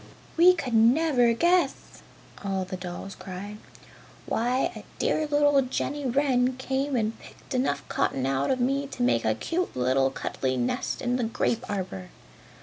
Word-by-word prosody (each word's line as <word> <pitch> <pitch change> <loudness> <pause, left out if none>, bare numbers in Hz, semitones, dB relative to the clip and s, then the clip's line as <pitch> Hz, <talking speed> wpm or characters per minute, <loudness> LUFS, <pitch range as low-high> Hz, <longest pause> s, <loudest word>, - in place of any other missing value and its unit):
"We 360 +2 +7
could 255 -8 -4
never 245 +2 +4
guess!" 345 +2 +1 0.4
all 195 -1 -1
the 185 - -5
dolls 185 +1 -7
cried. 200 +3 -8 0.7
"Why 245 +3 0
a - - -9
dear 310 - 0
little 290 -1 +4
Jenny 275 +2 -2
Wren 255 -1 +2
came 265 +1 -1
and 225 -1 -1
picked - - -12
enough 195 - -1
cotton 130 -1 0
out 135 +1 0
of 260 - +1
me 275 +3 0
to 250 - -4
make 245 - +2
a - - +2
cute 355 +2 -2
little 130 +2 +2
cuddly 130 -1 -3
nest 120 0 -2
in 245 0 +1
the 250 - -1
grape 230 +2 -1
arbor!" 180 - -4
245 Hz, 155 wpm, -26 LUFS, 185-275 Hz, 0.7 s, We